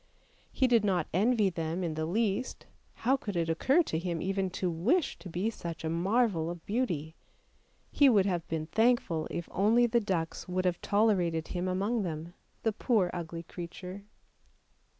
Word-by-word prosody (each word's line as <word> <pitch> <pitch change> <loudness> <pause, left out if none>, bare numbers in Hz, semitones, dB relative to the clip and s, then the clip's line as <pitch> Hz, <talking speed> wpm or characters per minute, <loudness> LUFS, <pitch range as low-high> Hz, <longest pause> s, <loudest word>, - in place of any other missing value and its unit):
He 260 - +2
did 235 -4 +4
not 185 -6 +1
envy 210 +1 +3
them 165 +2 -3
in 165 -2 -1
the 155 0 -2
least, 215 +5 -1 0.3
how 255 +4 +2
could 205 -7 -5
it 165 -1 0
occur 270 - +3
to 160 - -2
him 170 -1 -3
even 190 +1 -1
to 185 +1 -2
wish 215 - +1
to 185 - -9
be 185 +7 -1
such 170 -6 -7
a 160 - -1
marvel 185 -1 +1
of 175 -1 -7
beauty; 180 - -1 0.8
he 285 -2 +5
would 205 -6 +4
have 175 -4 -1
been 160 -1 -2
thankful 215 -4 +1
if 170 - -4
only 225 +5 +4
the 235 0 +2
ducks 180 -5 -2
would 185 0 -1
have 180 -1 0
tolerated 185 -7 +1
him 180 +1 -2
among 200 +5 0
them 165 -2 -5
— - - -39
the 225 - +1
poor 205 -6 +1
ugly 170 -1 -5
creature 180 +3 -8
185 Hz, 175 wpm, -30 LUFS, 170-220 Hz, 0.8 s, he